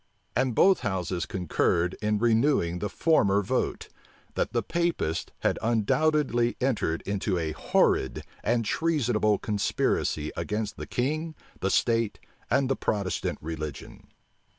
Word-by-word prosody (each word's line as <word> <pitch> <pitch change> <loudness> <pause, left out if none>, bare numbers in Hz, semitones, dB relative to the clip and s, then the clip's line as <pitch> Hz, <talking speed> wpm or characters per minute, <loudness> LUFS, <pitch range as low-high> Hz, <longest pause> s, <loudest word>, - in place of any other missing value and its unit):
And 125 -1 +1
both 190 - +5
houses 95 -5 -2
concurred 90 0 0
in 105 0 +1
renewing 115 - +2
the 105 - -2
former 105 -11 +3
vote, - - -1 0.5
that - - -1
the - - 0
Papists 170 - -1
had - - +1
undoubtedly 120 +2 +2
entered 120 -11 0
into 100 -1 -1
a 80 -2 -1
horrid 65 -4 +1 0.2
and 120 -1 +1
treasonable 120 -8 +1
conspiracy 100 -7 0
against 105 0 -3
the - - -6
king, 155 +6 -2 0.2
the 95 - 0
state, 115 0 +1 0.3
and 135 -1 +2
the 135 - +1
Protestant 100 -4 -1
religion. 75 -2 -7
110 Hz, 125 wpm, -27 LUFS, 95-130 Hz, 0.5 s, both